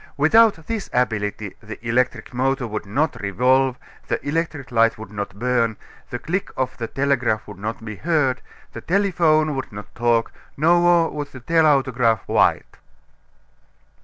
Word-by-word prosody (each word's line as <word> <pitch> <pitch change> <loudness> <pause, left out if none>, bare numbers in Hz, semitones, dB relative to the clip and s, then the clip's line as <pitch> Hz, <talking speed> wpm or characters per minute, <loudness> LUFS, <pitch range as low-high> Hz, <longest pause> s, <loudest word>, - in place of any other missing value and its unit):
Without 165 +3 +4
this 225 0 -4
ability 105 -4 -1
the 110 0 -8
electric 125 +2 0
motor 130 +1 0
would 105 -2 -5
not 145 +9 -1
revolve, 125 +6 +2 0.3
the - - -1
electric 150 -3 -2
light 115 -1 +3
would 110 -2 -10
not 100 -2 -5
burn, 115 -1 0 0.3
the 120 - -4
click 180 +10 -3
of 130 -1 -1
the 115 - -3
telegraph 120 -5 0
would - - -10
not 110 +2 -5
be 105 -2 -6
heard, 150 -6 0 0.3
the - - -7
telephone 165 -5 +2
would 135 - -5
not 105 0 -10
talk, 120 -1 +1 0.3
nor 170 +2 +4
would 145 -1 -4
the 135 -2 -12
telautograph 130 -7 +2
write. - - +1
130 Hz, 145 wpm, -22 LUFS, 115-155 Hz, 0.3 s, Without